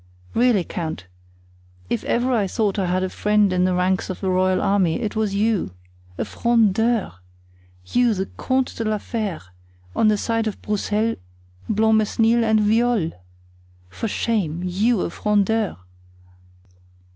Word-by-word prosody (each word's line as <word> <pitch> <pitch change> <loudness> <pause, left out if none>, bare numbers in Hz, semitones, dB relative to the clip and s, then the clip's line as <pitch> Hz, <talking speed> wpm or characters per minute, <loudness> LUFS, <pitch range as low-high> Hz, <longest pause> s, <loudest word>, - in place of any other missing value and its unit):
Really, 235 -6 +3
count, 160 - -5 0.8
if 120 - -2
ever 245 +2 +1
I 210 -5 +1
thought 205 +1 -1
that 190 -2 0
I - - -1
had 185 +1 +1
a 185 - -1
friend 210 -2 +2
in 180 0 +2
the 185 -1 +1
ranks 180 +1 0
of 185 - -5
the 190 -2 -1
royal 185 0 +2
army, 190 -5 +1
it 215 -1 -3
was 215 -2 0
you. 210 - 0 0.4
A - - -2
Frondeur! 230 - +1 0.7
you, 240 - +2
the 190 0 -2
Comte 260 0 0
de 230 - -2
la 215 -1 0
Fere, 205 - -4 0.5
on 220 - +3
the 215 -1 +3
side 225 +1 -1
of 215 - -4
Broussel, 210 +2 -1 0.5
Blancmesnil 220 +2 +3
and 220 -1 +3
Viole! 220 -4 +2 0.8
For 225 - -4
shame! 190 -7 -1
you, 200 +4 +1
a - - -2
Frondeur!" 210 +2 0
210 Hz, 145 wpm, -22 LUFS, 185-225 Hz, 0.8 s, Really